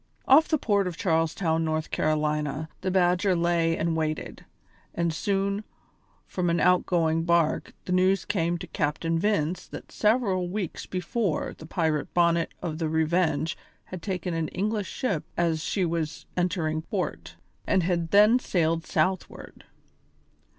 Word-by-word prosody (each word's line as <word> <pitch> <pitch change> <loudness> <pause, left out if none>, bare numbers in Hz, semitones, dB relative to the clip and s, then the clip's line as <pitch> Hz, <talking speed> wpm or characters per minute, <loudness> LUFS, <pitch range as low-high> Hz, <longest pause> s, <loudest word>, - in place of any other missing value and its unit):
Off 300 +4 +7
the 310 - +2
port 200 -7 +1
of 175 -2 -5
Charles 165 -3 +1
Town, 165 -3 0
South 155 0 -2
Carolina, 150 -1 0
the 185 - -1
Badger 180 +1 +2
lay 170 -1 +1
and 165 0 0
waited, 155 -1 -3 0.5
and 170 -1 0
soon, 200 +4 -1 0.6
from 180 -2 -1
an 170 0 +1
outgoing 165 -2 +2
bark, 170 -2 +1
the - - -4
news 185 0 +3
came 175 -4 0
to 170 - -7
Captain 165 +1 -1
Vince 180 -3 0
that - - -10
several 210 -5 +1
weeks 190 -3 -4
before 185 -1 -2
the 160 - -12
pirate 160 -3 -1
Bonnet 170 -1 +3
of 160 -2 -3
the 160 -2 -1
Revenge 160 -1 +1 0.3
had 185 -2 -8
taken 180 -3 -3
an 165 -1 -1
English 210 +3 -2
ship 200 - -2
as 165 -2 +1
she 190 0 0
was 165 -2 -3
entering 170 -3 0
port, 85 - -4 0.3
and 185 - +3
had 170 -1 0
then 210 +6 +6
sailed 165 -7 0
southward. 185 +4 -2
170 Hz, 145 wpm, -26 LUFS, 160-185 Hz, 0.6 s, Off